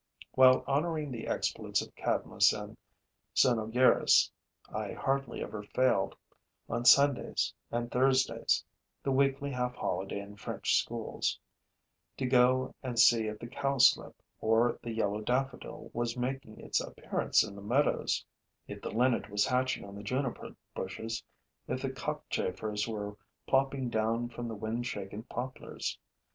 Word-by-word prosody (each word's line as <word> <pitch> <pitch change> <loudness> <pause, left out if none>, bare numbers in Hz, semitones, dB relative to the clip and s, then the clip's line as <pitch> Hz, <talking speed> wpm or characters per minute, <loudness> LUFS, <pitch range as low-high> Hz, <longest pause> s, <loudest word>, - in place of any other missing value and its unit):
While 130 0 +6
honoring 150 +1 0
the 115 -3 -5
exploits - - 0
of - - -14
Cadmus - - +2
and - - -7 0.6
Cynoegirus, 120 +1 +4 0.4
I - - -3
hardly 135 0 -1
ever 105 - -6
failed, 120 -1 +1 0.5
on 120 - -2
Sundays 140 +1 +4 0.2
and 120 0 -2
Thursdays 130 +1 +2 0.4
[the 135 - 0
weekly 140 +1 +2
half 125 -1 -2
holiday 95 +1 -2
in 100 +1 -10
French 95 - -2
schools], - - -3 0.8
to 135 - -1
go 130 0 +3
and 125 -3 -4
see 115 -1 +6
if 105 0 -4
the 120 - -8
cowslip 135 +1 +3 0.2
or 115 +2 +2
the 120 - -6
yellow 110 -2 -1
daffodil 125 +3 -2
was 120 0 -2
making 125 -2 -4
its - - 0
appearance - - +1
in 105 - -7
the 100 - -9
meadows, 125 +8 +1 0.4
if - - -8
the - - -4
Linnet 120 +1 +1
was 105 0 +2
hatching 130 -1 0
on 100 - -10
the 100 - -8
juniper 125 +4 -3 0.2
bushes, 110 +4 -4 0.4
if - - -2
the - - -2
Cockchafers 105 -1 -3
were 105 -2 -4 0.3
plopping 135 -1 +1
down 115 +1 0
from 120 0 -6
the 115 - -5
wind 110 +3 -3
shaken 105 -1 -5
poplars. 125 +2 -5
120 Hz, 140 wpm, -31 LUFS, 110-130 Hz, 0.8 s, While